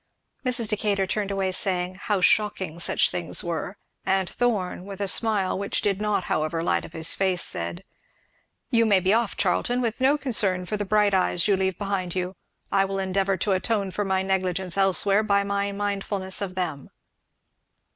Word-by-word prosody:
Mrs. 245 -3 +2
Decatur 205 -2 0
turned 205 +1 -2
away, 195 -1 -1
saying 185 -1 0
"how 195 +1 -2
shocking 190 -4 +1
such - - +2
things 170 -2 0
were;" 170 +3 -4 0.3
and 190 -1 +1
Thorn, 205 -7 -1
with 200 -1 -8
a 200 - -1
smile 200 -3 +1
which 200 - -2
did 200 -1 0
not 210 -3 0
however 155 +1 -1
light - - +1
up - - -13
his 160 -1 +2
face, 190 -2 +1
said, 85 0 -1 0.9
"You 230 -1 +3
may 200 -3 +5
be 190 +2 +2
off, 230 -2 0
Charlton, 245 0 +1
with 235 0 -2
no 275 +3 +4
concern 200 -10 +1
for 210 - -3
the 205 0 -3
bright 210 0 +2
eyes 185 -1 +1
you 200 - +4
leave 190 -1 -1
behind 195 -3 -3
you 185 +1 -3 0.4
I 195 - +3
will 195 0 -3
endeavour 195 0 0
to 200 - -1
atone 195 +1 0
for 205 - -2
my 190 -1 0
negligence 185 -2 -1
elsewhere, 195 +1 +3
by 200 -2 +2
my 200 0 -1
mindfulness 200 -1 -3
of 185 -2 -4
them." 160 -7 -3
195 Hz, 180 wpm, -25 LUFS, 185-205 Hz, 0.9 s, may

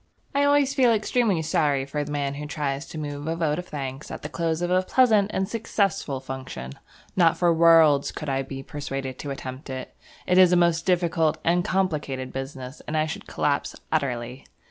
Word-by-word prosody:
I 280 +1 +3
always 285 -1 +3
feel 260 -4 +4
extremely 215 -5 +1
sorry 145 -3 +1
for 145 +1 -3
the 145 - -7
man 140 -1 -1
who 150 +1 -6
tries 145 -1 -3
to - - -8
move 145 -1 -5
a 165 - 0
vote 160 -2 0
of 180 - -7
thanks 135 -1 -6
at - - -7
the - - -4
close 165 0 -1
of 175 - -1
a 185 0 +4
pleasant 215 -1 +3
and 190 -2 -1
successful 200 - -1
function. 130 - -7 0.4
Not 170 -3 +4
for 175 -1 +3
worlds 160 -4 +5
could 150 - -7
I 135 -1 0
be 135 0 -7
persuaded 135 -2 -5
to 145 - -5
attempt 135 0 -7
it. 130 -1 -6 0.3
It 180 0 +4
is 185 -1 +7
a - - +5
most 170 0 +2
difficult 170 -3 +2
and 175 +1 +2
complicated 155 -9 -1
business, 135 0 -6
and 155 - -1
I 155 - +2
should 160 - -6
collapse - - -1 0.2
utterly. 125 -1 -2
155 Hz, 195 wpm, -25 LUFS, 135-180 Hz, 0.4 s, is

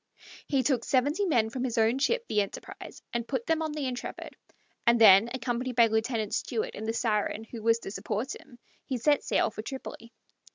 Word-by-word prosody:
He 275 -3 +1
took 255 -5 +1
seventy 285 - +1
men 225 -9 +2
from 255 +1 -3
his 245 -2 -2
own 225 +3 +3
ship, 470 - +1
the 210 - +2
Enterprise, 200 - -8
and 235 -1 -2
put 260 -4 -2
them 325 0 +1
on 315 -1 -2
the 300 -2 -3
Intrepid, 250 -1 -6 0.5
and 235 0 +5
then, 210 0 +8
accompanied 250 0 -3
by 235 - +7
Lieutenant 220 -1 -1
Stewart 460 +2 -2
in 220 - -6
the 225 - 0
Siren, 220 -2 -1
who 225 0 -9
was 230 +1 +3
to - - -7
support 220 +4 -3
him, 240 - -15 0.3
he 260 - -3
set 290 +4 +2
sail - - +1
for 215 - -6
Tripoli. 235 -1 -8
235 Hz, 200 wpm, -28 LUFS, 220-270 Hz, 0.5 s, then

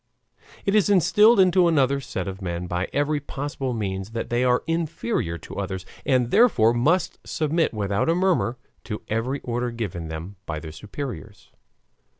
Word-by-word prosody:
It 195 - +1
is 210 -2 +4
instilled 205 +4 +5
into 185 -1 +5
another 140 -4 +2
set 95 -7 -4
of 95 +1 -6
men 85 -1 -3
by 90 +1 -2
every 145 +1 +1
possible 140 -2 -4
means 100 -2 -3
that 115 - -4
they 120 +1 +2
are 125 -1 +2
inferior 165 - -1
to - - -10
others, 95 -2 -4 0.2
and 125 -3 +2
therefore 165 - +5
must 155 +10 +1
submit 160 +1 0
without 100 +4 0
a 165 - +3
murmur 180 -9 +1 0.3
to 105 -3 -5
every 120 +6 -1
order 120 0 -2
given 100 -8 -4
them 80 +5 -7
by 80 - -3
their 80 0 -8
superiors. 105 - -8
120 Hz, 160 wpm, -24 LUFS, 100-160 Hz, 0.3 s, instilled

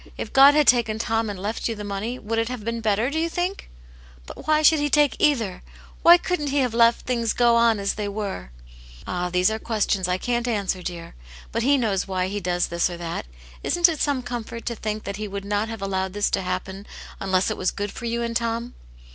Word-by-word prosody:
If - - -6
God 275 +2 +8
had 300 -1 +4
taken 235 -4 +3
Tom 225 0 -1
and 200 - -5
left 210 +4 -3
you 225 - -2
the 210 - -7
money, 205 +5 -4
would 225 0 -2
it 230 +1 -1
have 250 -4 -6
been 230 0 -2
better, 220 +4 +1
do 315 - -1
you 335 +1 0
think 355 +3 -3 0.2
?" - - -22
" - - -23
But - - -11
why 310 0 +3
should 310 0 +6
He 290 0 0
take 295 -1 +3
either 225 -11 +1 0.2
> - - -22
Why 345 +1 +8
couldn't 355 -4 -2
He 285 +1 -1
have 250 -4 +1
let 230 0 +5
things 235 -3 -2
go 240 -1 +4
on 230 -2 +4
as 200 0 -1
they 210 -1 -4
were 200 - -5 0.3
?" - - -18
"Ah, 180 0 -2
these 180 +3 +2
are 220 - -3
questions 210 -4 0
I 180 0 0
can't 240 +4 -1
answer, 200 -5 -1
dear. 170 -2 -7 0.4
But 230 - -1
He 280 +4 +3
knows 205 -7 0
why 185 -1 -1
He 205 +1 -3
does 175 -1 -1
this 170 +1 +1
or 175 - -6
that. 170 - -5 0.3
Isn't 345 0 +3
it 320 -4 -3
some 280 -3 0
comfort 235 -1 -6
to 235 - -2
think 215 0 -4
that 200 0 -5
He 215 0 -4
would 200 0 -6
not 205 +2 -1
have 225 -3 -6
allowed 190 -1 -2
this 205 0 0
to - - 0
happen 190 +2 -5 0.3
unless 190 -1 +1
it - - -3
was 185 - 0
good 205 0 -4
for 240 - -8
you 235 0 -1
and 230 0 -3
Tom 235 +1 -2
220 Hz, 250 wpm, -24 LUFS, 195-240 Hz, 0.4 s, God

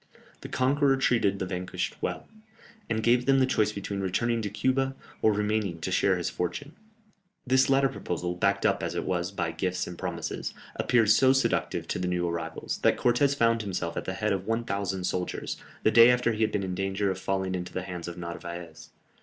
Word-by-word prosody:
The - - -8
conqueror 135 +1 +2
treated 115 -7 +2
the 95 - -2
vanquished 90 0 -3
well, - - -3 0.6
and 110 0 -1
gave 120 +2 +3
them 135 0 +5
the 130 - +4
choice 110 -5 +1
between 100 -1 -4
returning 115 +5 0
to 105 - -2
Cuba, 130 +5 0 0.3
or 110 - +5
remaining 105 -4 -1
to 95 - -3
share 95 +1 +3
his 90 - -2
fortune. 90 - -4 0.7
This 130 +1 +3
latter 135 0 +4
proposal, 90 -7 -3
backed 100 +2 +1
up - - +2
as - - -3
it - - -1
was 90 0 -1
by 100 - -2
gifts 90 -1 -2
and 90 - -8
promises, - - -4 0.2
appeared 115 -4 +3
so 130 +4 +6
seductive 135 - 0
to - - -1
the 90 - -1
new 90 -1 0
arrivals, 85 -1 -4
that - - +3
Cortès 135 +4 +3
found 115 -3 +3
himself 90 -5 -3
at - - -3
the 95 - -3
head 105 0 0
of 95 0 -3
1000 100 -5 -1
soldiers, 90 0 -3 0.3
the - - +4
day 115 +2 +8
after 125 -1 +3
he 110 0 -3
had 110 - +2
been 100 - -1
in 95 -1 -3
danger 95 +1 -1
of 95 - -5
falling 95 0 -1
into 90 -1 -4
the 95 - -3
hands 90 -2 -6
of 85 - -7
Narvaez. 85 -2 -7
100 Hz, 205 wpm, -28 LUFS, 90-120 Hz, 0.7 s, day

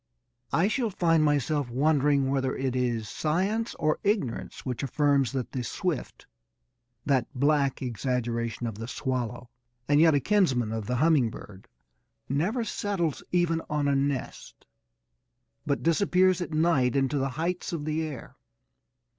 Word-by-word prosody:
I 175 +4 +3
shall 230 +1 0
find 165 -5 +2
myself 145 -2 +1
wondering 140 +1 +2
whether 135 -1 0
it 130 -1 -2
is 120 -4 -1
science 190 - -1
or 155 -2 0
ignorance 200 - -2
which 125 -3 -3
affirms 140 -1 +2
that 130 -3 -3
the 125 - -3
swift 165 +5 -3 0.8
(that 135 -4 +2
black 140 0 +1
exaggeration 120 -2 -2
of 110 -2 -5
the 115 - -5
swallow 125 -2 -3 0.4
and 145 +1 +4
yet 160 -2 +6
a - - +4
kinsman 135 - +2
of 110 -2 -4
the 125 - 0
humming 145 -3 +3
bird) 100 -3 -11 0.6
never 180 - 0
settles 195 -8 -2
even 175 -2 +1
on 150 -1 0
a 140 - +2
nest, 140 -1 -3 1.0
but 140 - 0
disappears 185 +1 +3
at 175 - -3
night 155 -6 +2
into 135 +1 +1
the 135 0 0
heights 175 +3 -2
of 160 -4 -4
the 155 +1 -1
air. 150 -6 -7
145 Hz, 145 wpm, -27 LUFS, 125-165 Hz, 1.0 s, yet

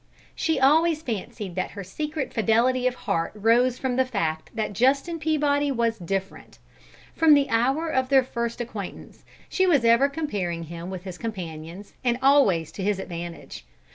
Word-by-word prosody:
She 320 - 0
always 315 +4 +3
fancied 210 - -5
that 185 +1 -2
her 200 - -4
secret 300 - -4
fidelity 240 +3 +2
of 250 - -1
heart 170 -6 -1
rose 235 +4 +3
from 255 -2 -2
the 260 - +4
fact 165 -11 -3
that 215 -2 -2
Justin 275 - +1
Peabody 290 -2 +1
was 230 -3 0
"different." 190 +2 -5 0.6
From 320 -2 +6
the 285 -1 +2
hour 265 +8 +1
of 260 -5 0
their 270 -1 +5
first 235 -2 -4
acquaintance, 220 -5 -7 0.2
she 375 0 +1
was 285 -9 +3
ever 235 +5 +5
comparing 200 - -3
him 170 +2 -7
with 185 -2 -6
his 185 -2 -8
companions, 180 -3 -7
and 240 -1 +1
always 255 - +3
to 190 - -6
his 205 0 +1
advantage. 170 - -7
235 Hz, 165 wpm, -25 LUFS, 190-275 Hz, 0.6 s, From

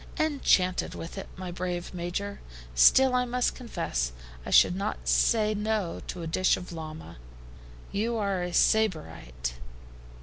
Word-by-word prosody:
"Enchanted 270 -12 +2
with 165 - -7
it, 195 - -7
my 185 -1 -5
brave 175 0 -4
Major; 180 +3 -4 0.3
still 260 - +6
I 250 0 +3
must 250 0 0
confess 170 - -3 0.3
I - - -7
should 175 - +6
not 200 +3 -4
say 215 -2 +3
no 210 -4 -2
to 175 - -5
a - - -4
dish 185 +3 +2
of 180 - -9
llama." 155 - -8 0.7
"You 225 +3 -1
are 200 -3 -1
a 180 0 -3
Sybarite." 60 - 0
185 Hz, 140 wpm, -28 LUFS, 170-220 Hz, 0.7 s, still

